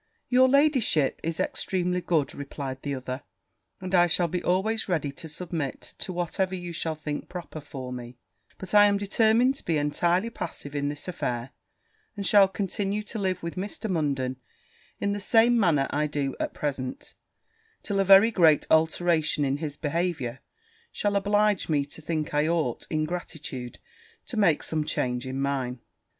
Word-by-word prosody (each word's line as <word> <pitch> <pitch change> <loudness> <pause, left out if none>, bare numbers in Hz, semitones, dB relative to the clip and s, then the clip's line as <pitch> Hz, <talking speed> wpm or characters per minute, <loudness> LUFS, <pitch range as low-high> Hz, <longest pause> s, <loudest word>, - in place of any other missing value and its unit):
'Your 255 +1 +5
ladyship 265 - +3
is 165 0 -3
extremely 180 -1 -1
good,' 155 -6 0
replied 140 -2 -6
the 140 -1 -2
other; 130 0 -5 0.6
'and 185 0 -6
I 175 -1 +6
shall 175 0 +2
be 180 +2 -2
always 200 +5 0
ready 155 -5 0
to 150 +4 -10
submit 160 -3 -4 0.2
to - - -2
whatever 180 +2 -1
you 175 -1 -6
shall 160 -1 -2
think 150 -1 -5
proper 165 -3 -7
for 130 -3 -7
me: 120 0 -8 0.4
but 190 0 -8
I 205 0 +8
am 205 -1 +3
determined 225 +5 +3
to - - -11
be 165 -2 +1
entirely 170 +8 +1
passive 145 -9 -6
in 145 -1 -1
this 145 +3 -7
affair, 125 -7 -3 0.6
and 200 -2 -4
shall 200 0 +6
continue 200 +1 -2
to 215 +1 -6
live 185 -3 -1
with 170 - -4
Mr. 200 +3 -4
Munden 135 -6 -1 0.6
in 200 - 0
the 205 - -3
same 230 +4 +4
manner 160 -9 +3
I 150 +1 +1
do 145 -2 -2
at - - -3
present, 135 -3 -4 0.7
till 200 -2 -1
a - - +4
very 195 +4 +7
great 165 -7 +4
alteration 160 -1 +2
in 135 +1 0
his 145 -2 -5
behaviour 150 -5 -2 0.5
shall 205 -1 -1
oblige 205 -1 +2
me 145 -3 +2
to 145 +3 -12
think 155 -1 -3
I 150 +1 +2
ought, 160 -8 -1
in 155 -1 0
gratitude, 155 -7 -6 0.5
to - - -7
make 195 -8 +3
some 155 -1 -1
change 125 -3 -2
in 130 +1 -3
mine.' 135 -3 -1
165 Hz, 170 wpm, -27 LUFS, 145-195 Hz, 0.7 s, I